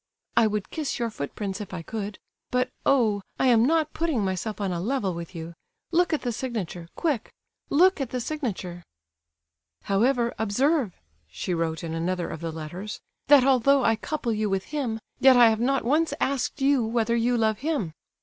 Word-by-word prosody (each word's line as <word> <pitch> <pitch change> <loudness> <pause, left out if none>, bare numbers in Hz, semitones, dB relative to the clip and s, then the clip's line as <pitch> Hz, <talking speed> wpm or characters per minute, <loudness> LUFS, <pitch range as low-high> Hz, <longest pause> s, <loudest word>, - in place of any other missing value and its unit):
I 225 - +5
would 210 -2 -3
kiss 310 -3 -2
your 235 -3 -2
footprints 195 +5 -4
if 195 -2 -7
I 170 - -6
could; 210 +1 -5 0.3
but, 250 0 0 0.2
oh! 225 -7 +3 0.2
I - - +1
am 235 0 +5
not 315 -1 +1
putting 310 -11 0
myself 190 +3 -3
on 195 -2 -1
a 175 - -2
level 205 -1 -1
with 170 +1 -7
you!—Look 170 - -3
at 310 - 0
the 245 - 0
signature—quick, 220 - -3 0.4
look 360 +2 +4
at 265 - -2
the 250 - -2
signature!" 210 - -4 1.0
"However, 235 +4 +2
observe" 245 - +1 0.3
(she 80 - -4
wrote 165 -1 -2
in 165 -1 -4
another 175 +2 -1
of 160 - -6
the 165 -1 -3
letters), 170 +6 -6 0.3
"that 285 -2 +7
although 270 +1 +4
I 225 - +4
couple 240 0 -2
you 215 -1 0
with 195 -1 0
him, 255 -6 -3 0.2
yet 265 -1 +7
I 235 -2 +8
have 220 - -1
not 270 0 +1
once 310 +6 +2
asked 275 +1 -1
you 275 -2 +3
whether 230 +1 +1
you 240 +1 +2
love 220 -2 +1
him. 275 - -2
225 Hz, 180 wpm, -26 LUFS, 190-270 Hz, 1.0 s, I